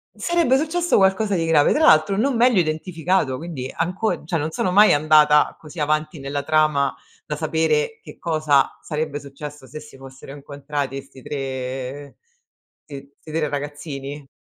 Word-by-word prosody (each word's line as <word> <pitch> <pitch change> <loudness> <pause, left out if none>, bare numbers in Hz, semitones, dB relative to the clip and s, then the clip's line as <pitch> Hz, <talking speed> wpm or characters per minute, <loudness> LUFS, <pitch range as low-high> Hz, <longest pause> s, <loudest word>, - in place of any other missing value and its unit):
Sarebbe 340 -7 +2
successo 335 +3 +1
qualcosa 195 +1 +2
di 165 - 0
grave. 160 -3 +4
Tra 315 - +3
l'altro 155 +5 +5
non 255 +4 +1
meglio 240 -3 +4
identificato, 160 -2 -1
quindi 145 -5 -6
anco 185 +7 -2
cioè 165 +2 -1
non 155 0 -2
sono 180 +3 -1
mai 210 +3 +6
andata 150 0 +4
così 155 +1 -11
avanti 155 +1 -1
nella 140 +1 -3
trama 155 -3 +2 0.3
da 150 - -4
sapere 160 +5 0
che - - -13
cosa 155 -4 +1
sarebbe 150 -2 -3
successo 145 0 -10
se 145 +5 -8
si 150 -2 -14
fossero 135 0 -12
incontrati 140 -1 -5
'sti 135 -1 -17
tre 135 0 -5 0.7
ti 140 -1 -10
'sti 155 - -12
3 155 -2 -1
ragazzini 145 -1 -6
150 Hz, 155 wpm, -22 LUFS, 140-165 Hz, 0.7 s, mai